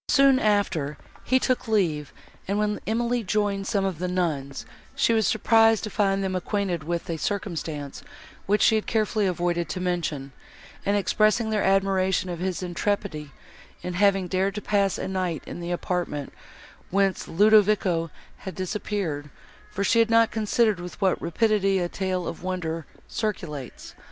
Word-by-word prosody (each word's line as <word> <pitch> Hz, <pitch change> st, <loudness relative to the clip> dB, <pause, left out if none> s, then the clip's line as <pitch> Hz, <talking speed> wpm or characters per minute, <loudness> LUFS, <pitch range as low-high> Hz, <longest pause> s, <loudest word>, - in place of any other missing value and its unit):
Soon 275 Hz, -2 st, +5 dB
after, 190 Hz, -, +1 dB, 0.3 s
he 260 Hz, -, +3 dB
took 255 Hz, -1 st, 0 dB
leave, 165 Hz, -10 st, 0 dB, 0.4 s
and, 200 Hz, +2 st, 0 dB
when 210 Hz, 0 st, 0 dB
Emily 235 Hz, +2 st, 0 dB
joined 200 Hz, -1 st, 0 dB
some 195 Hz, -2 st, +1 dB
of 185 Hz, -5 st, -2 dB
the 180 Hz, -, -1 dB
nuns, 155 Hz, -7 st, -2 dB, 0.3 s
she 230 Hz, -, +3 dB
was 220 Hz, -2 st, +2 dB
surprised 225 Hz, 0 st, +4 dB
to 215 Hz, -, -4 dB
find 195 Hz, -1 st, +1 dB
them 190 Hz, -1 st, -1 dB
acquainted 185 Hz, -3 st, -1 dB
with 170 Hz, +2 st, -3 dB
a 165 Hz, -, -2 dB
circumstance, 160 Hz, -6 st, -4 dB, 0.5 s
which 205 Hz, +2 st, +3 dB
she -, -, +5 dB
had 215 Hz, -1 st, 0 dB
carefully 215 Hz, -2 st, +1 dB
avoided 175 Hz, -2 st, -1 dB
to -, -, -3 dB
mention, 165 Hz, -6 st, -2 dB, 0.6 s
and 200 Hz, +1 st, +3 dB
expressing 215 Hz, +3 st, +2 dB
their 210 Hz, -1 st, +1 dB
admiration 190 Hz, -1 st, +2 dB
of 170 Hz, -, -5 dB
his 185 Hz, 0 st, -2 dB
intrepidity 175 Hz, -4 st, -2 dB, 0.5 s
in 180 Hz, -, -3 dB
having 195 Hz, 0 st, +3 dB
dared 190 Hz, +2 st, 0 dB
to -, -, -2 dB
pass 200 Hz, -2 st, +1 dB
a -, -, -4 dB
night 185 Hz, -5 st, -2 dB
in -, -, -7 dB
the 170 Hz, 0 st, -5 dB
apartment, 175 Hz, -5 st, -3 dB, 0.6 s
whence 195 Hz, -1 st, +1 dB
Ludovico 200 Hz, -3 st, +4 dB, 0.3 s
had 190 Hz, -, -8 dB
disappeared; 185 Hz, -6 st, -3 dB, 0.4 s
for 200 Hz, -, -3 dB
she 230 Hz, +4 st, +3 dB
had 230 Hz, 0 st, +4 dB
not 230 Hz, 0 st, +4 dB
considered 215 Hz, -2 st, +1 dB
with 175 Hz, 0 st, -8 dB
what 190 Hz, -3 st, +1 dB
rapidity 195 Hz, +1 st, +2 dB
a 175 Hz, -2 st, 0 dB
tale 185 Hz, -1 st, -2 dB
of -, -, -6 dB
wonder 170 Hz, -3 st, -3 dB, 0.2 s
circulates. 165 Hz, -, -5 dB
190 Hz, 160 wpm, -25 LUFS, 175-210 Hz, 0.6 s, Soon